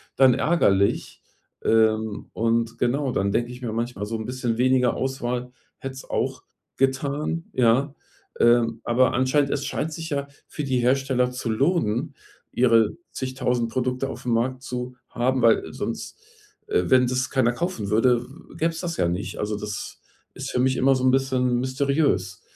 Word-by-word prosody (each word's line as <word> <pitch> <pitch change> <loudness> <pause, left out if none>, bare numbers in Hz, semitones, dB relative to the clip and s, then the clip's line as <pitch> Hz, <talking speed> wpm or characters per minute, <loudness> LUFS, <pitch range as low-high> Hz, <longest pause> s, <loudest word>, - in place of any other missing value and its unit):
dann 130 -2 +6
ärgerlich. 100 - +1 0.4
Ähm, 110 -1 +2
und, 115 0 0
genau, 130 +2 0
dann 100 -3 0
denke 120 +1 0
ich 125 +1 -10
mir 115 -3 -3
manchmal, 115 -3 -3
so 115 +2 -4
'n 110 - -5
bisschen 125 -2 -2
weniger 125 0 +3
Auswahl 125 -2 -3 0.3
hätte 135 0 -6
es 135 - -11
auch - - -2 0.3
getan, 140 +5 0
ja? 130 +4 +2 0.5
Ähm, 115 -1 +4
aber 120 +1 +3
anscheinend 130 +3 +2
es 140 - -2
scheint 160 - -2
sich 165 +1 -6
ja 140 -1 -1 0.2
für 150 - -5
die 135 -2 0
Hersteller 125 0 +2
zu 125 -2 -4
lohnen, 135 - 0 0.4
ihre 115 -2 +4 0.2
zigtausend 125 -2 -1
Produkte 130 +2 -1
aufm 125 -2 -4
Markt 125 +3 0
zu 125 0 -5
haben, 130 +1 0
weil 115 -1 +3
sonst, - - -5 0.5
äh, 430 0 +2
wenn 130 -1 +5
das 130 +1 -1
keiner 130 -3 +2
kaufen 120 - -3
würde, 120 +3 +3
w 135 +8 -15
gäbe 165 +1 +1
es 165 - -7
das 170 -1 -3
ja 85 - +1
nicht. 90 +4 -4
Also, 105 0 -2
das 105 -1 -6 0.4
ist - - -5
für - - -1
mich 130 +1 +2
immer 135 +1 +4
so 130 - -2
'n 130 - +5
bisschen 130 -2 +1
mysteriös, 130 - 0
125 Hz, 170 wpm, -24 LUFS, 115-135 Hz, 0.5 s, dann